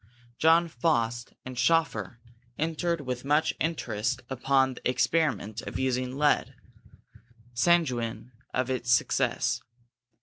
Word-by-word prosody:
John 165 +2 +5
Faust 120 -5 -1
and 130 0 -7
Schoeffer 125 - +1 0.4
entered 165 +1 -1
with 125 -2 -4
much 150 +3 +2
interest 125 -6 -2
upon 130 0 +2
the 125 - -3
experiment 125 -4 0
of - - -6
using 130 0 -1
lead, 150 0 +2 1.0
sanguine 125 -5 +1 0.2
of 130 +1 -1
its 120 -2 -1
success. 120 - +1
130 Hz, 105 wpm, -28 LUFS, 120-160 Hz, 1.0 s, John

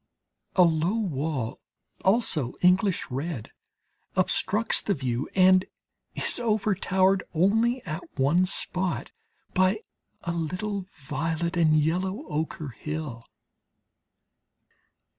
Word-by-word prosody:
A 185 - +7
low 165 +4 +2
wall, 150 - -2 0.4
also 190 - +2
English 180 -2 +3
red, 135 -2 -4 0.6
obstructs 215 +3 +2
the 200 - 0
view 130 -2 -2
and 185 0 +6 0.5
is - - -1
overtowered 195 -4 +2
only 225 +8 +2
at 160 +1 -4 0.2
one 170 +8 +3
spot 180 -1 0 0.4
by 185 +3 +2 0.4
a 170 - -2
little 180 +4 -3
violet 160 +4 -3
and 160 -3 +4
yellow 185 - 0
ochre 155 -1 -3
hill. 150 -3 -6
175 Hz, 95 wpm, -27 LUFS, 155-195 Hz, 0.6 s, A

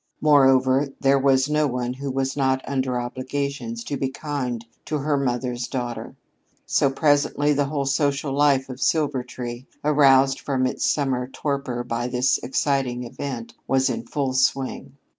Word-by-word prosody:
Moreover, 135 -2 +4
there 135 0 +3
was 135 0 +3
no 150 0 +2
one 125 -1 -2
who 140 +2 -5
was 135 0 -1
not 130 -2 0
under 130 -2 -1
obligations 140 - -4
to 145 - -3
be 135 - -1
kind 130 -5 -4 0.2
to 150 +2 -1
her 145 +1 0
mother's 125 -2 -1
daughter. 120 -3 -5 0.5
So, 140 - +2
presently 145 +1 +2
the 145 0 +1
whole 140 0 -2
social 140 0 0
life 140 -2 +3
of 130 0 -8
Silvertree, 130 -5 -1 0.2
aroused 135 -2 +4
from 130 -2 -1
its 130 - -2
midsummer 130 -3 -1
torpor 135 -3 -3
by 120 0 -2
this 125 +1 +1
exciting 130 -2 -1
event, 120 -1 -6
was 135 0 +2
in 230 - -5
full 140 -3 -1
swing. 130 +1 0
135 Hz, 150 wpm, -23 LUFS, 130-140 Hz, 0.5 s, Moreover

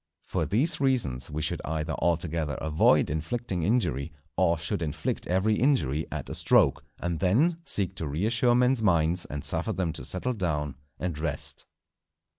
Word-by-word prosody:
For - - -2
these 130 - +2
reasons 115 - +1
we 75 +1 -3
should - - -1
either 80 +1 -3
altogether 80 -3 0
avoid 80 +2 +3
inflicting 90 - -3
injury, 85 - 0 0.2
or 85 -2 +2
should 85 +1 -2
inflict 80 -1 -3
every 95 +4 +2
injury 80 - +1
at - - -5
a - - -5
stroke, - - +3 0.2
and 85 -2 -3
then 140 - +2
seek 95 -2 +1
to 80 - -3
reassure 115 - +1
men's 125 0 +3
minds 85 -3 +2
and 75 -2 -6
suffer - - +1
them 90 -4 -2
to 85 - -5
settle 125 +8 -1
down 75 - -2 0.2
and 85 -4 -4
rest. 80 +1 0
85 Hz, 160 wpm, -27 LUFS, 80-110 Hz, 0.2 s, avoid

